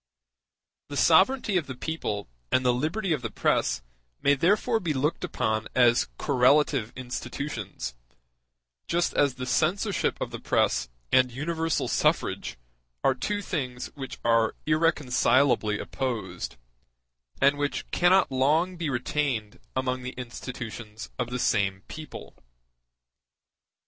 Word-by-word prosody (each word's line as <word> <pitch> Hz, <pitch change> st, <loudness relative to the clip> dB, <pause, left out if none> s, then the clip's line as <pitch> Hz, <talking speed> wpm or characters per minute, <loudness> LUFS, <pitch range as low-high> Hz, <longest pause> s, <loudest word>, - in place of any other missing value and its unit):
The 145 Hz, -, -5 dB
sovereignty 195 Hz, -, +4 dB
of 165 Hz, -, -1 dB
the 130 Hz, -, -6 dB
people 120 Hz, -8 st, -3 dB, 0.2 s
and 130 Hz, -, +2 dB
the 125 Hz, -, +4 dB
liberty 160 Hz, -, 0 dB
of 145 Hz, -, -2 dB
the -, -, -3 dB
press -, -, +1 dB, 0.4 s
may 140 Hz, -, +4 dB
therefore 205 Hz, -, +2 dB
be 165 Hz, -7 st, -2 dB
looked 145 Hz, +5 st, 0 dB
upon 110 Hz, 0 st, -1 dB
as 120 Hz, -2 st, +4 dB
correlative 135 Hz, -2 st, +3 dB
institutions; 125 Hz, -, -5 dB, 0.9 s
just 175 Hz, +1 st, +1 dB
as 140 Hz, -3 st, +2 dB
the 125 Hz, -, -5 dB
censorship 185 Hz, -, +1 dB
of -, -, -3 dB
the -, -, -6 dB
press -, -, +1 dB, 0.2 s
and 125 Hz, -1 st, +4 dB
universal 160 Hz, +5 st, -1 dB
suffrage -, -, 0 dB, 0.5 s
are 135 Hz, -, +4 dB
two 205 Hz, +11 st, -2 dB
things 125 Hz, -9 st, -3 dB
which 135 Hz, -3 st, -7 dB
are 115 Hz, -1 st, +3 dB
irreconcilably 135 Hz, -7 st, +3 dB
opposed, 105 Hz, -, -4 dB, 0.8 s
and 140 Hz, +1 st, +4 dB
which 145 Hz, 0 st, -1 dB
cannot 180 Hz, -2 st, +4 dB
long 155 Hz, +8 st, +2 dB
be 165 Hz, -3 st, -2 dB
retained 125 Hz, -4 st, -1 dB, 0.2 s
among 130 Hz, -1 st, -1 dB
the 125 Hz, 0 st, -5 dB
institutions 120 Hz, -3 st, -7 dB
of 120 Hz, -1 st, -1 dB
the 125 Hz, -, -2 dB
same 95 Hz, -5 st, +1 dB
people. 155 Hz, -1 st, -9 dB
130 Hz, 125 wpm, -27 LUFS, 120-160 Hz, 0.9 s, sovereignty